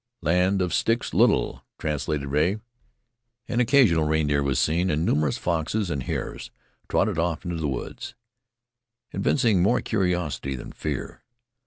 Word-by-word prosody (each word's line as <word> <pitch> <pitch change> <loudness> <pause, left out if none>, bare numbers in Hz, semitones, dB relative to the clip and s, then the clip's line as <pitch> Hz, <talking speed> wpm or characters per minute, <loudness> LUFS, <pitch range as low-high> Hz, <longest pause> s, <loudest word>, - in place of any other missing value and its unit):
"Land 90 +4 +2
of 90 - -2
Sticks 115 +1 0
Little," - - +2
translated 75 -1 -2
Rea. 75 +8 +2 0.9
An 120 +1 -1
occasional 120 - +4
reindeer 75 -2 +1
was 70 -1 0
seen 85 +4 +1
and 75 +1 0
numerous 75 -4 +1
foxes 85 +3 -1
and 70 -3 -2
hares - - -4 0.4
trotted - - +1
off 85 -1 -1
into 85 -1 -3
the 80 -2 -1
woods, 65 -3 -5 1.0
evincing 115 -9 +2
more 110 +7 +3
curiosity 90 - -1
than - - -8
fear. 75 -4 -5
80 Hz, 135 wpm, -25 LUFS, 75-95 Hz, 1.0 s, occasional